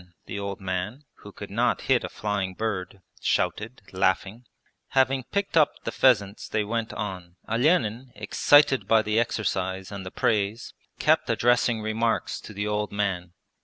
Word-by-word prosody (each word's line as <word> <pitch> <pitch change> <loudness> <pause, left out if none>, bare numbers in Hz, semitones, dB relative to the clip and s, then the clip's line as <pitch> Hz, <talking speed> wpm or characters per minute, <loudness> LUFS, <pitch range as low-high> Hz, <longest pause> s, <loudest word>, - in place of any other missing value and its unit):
the 100 - -5
old 100 -1 -4
man 95 +8 -4
(who 105 - -12
could 100 0 -9
not 120 +4 +1
hit 130 -2 +2
a - - -4
flying 100 -3 -3
bird) 100 -3 -3 0.2
shouted, 115 +4 -1
laughing. 95 +5 0 0.5
Having 130 -1 +3
picked 200 -3 -2
up 155 -3 +5
the - - -3
pheasants 105 -6 +2
they 110 - 0
went 115 +1 -2
on. 90 -4 -6
Olenin, 125 -1 +1
excited 135 +6 +4
by 110 -1 +4
the 105 +1 +1
exercise 95 -4 -2
and 100 -1 -6
the 95 - -6
praise, 105 +2 -1 0.2
kept - - +2
addressing 120 -2 +2
remarks 110 +1 -1
to - - -10
the 105 0 -3
old 105 0 -1
man. 95 -4 -2
105 Hz, 155 wpm, -26 LUFS, 100-120 Hz, 0.5 s, up